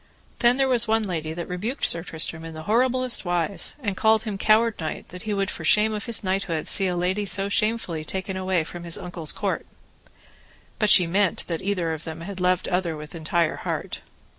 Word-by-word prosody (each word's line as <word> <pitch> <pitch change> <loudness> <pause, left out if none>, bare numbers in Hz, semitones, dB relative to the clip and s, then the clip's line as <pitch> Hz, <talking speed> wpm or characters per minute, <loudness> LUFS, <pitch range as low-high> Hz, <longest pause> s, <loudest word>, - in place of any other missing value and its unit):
Then 240 +1 +4
there 270 -1 +2
was 240 -3 +4
one 225 0 +2
lady 160 -5 -3
that 170 +1 -5
rebuked 215 +10 -3
Sir 165 - +3
Tristram 160 -1 -3
in 165 -1 -8
the 155 - -7
horriblest 255 +5 +2
wise, 175 +2 -1
and 205 -4 -1
called 220 +2 +3
him 215 -3 -4
coward 215 +3 +3
knight, 155 -2 -5
that 180 0 -9
he - - +1
would 195 -1 -1
for 160 - -7
shame 210 +6 +4
of 210 -1 -4
his 235 -3 +2
knighthood 185 -4 -1
see 195 - +5
a 180 - -1
lady 185 +4 0
so 195 0 +1
shamefully 215 -6 -1
be 155 - -7
taken 190 +3 -3
away 185 -3 0
from 175 +2 -9
his 170 -1 -1
uncle's 175 -3 -3
court. - - -3 1.1
But 215 - +2
she 185 -3 +8
meant 190 +3 +1
that 165 -2 -4
either 180 -5 -1
of 160 0 -6
them 160 0 -7
had 190 +2 -7
loved 180 0 +1
other 175 -3 -1
with 150 0 -10
entire 165 0 0
heart. - - -4
185 Hz, 215 wpm, -24 LUFS, 170-215 Hz, 1.1 s, she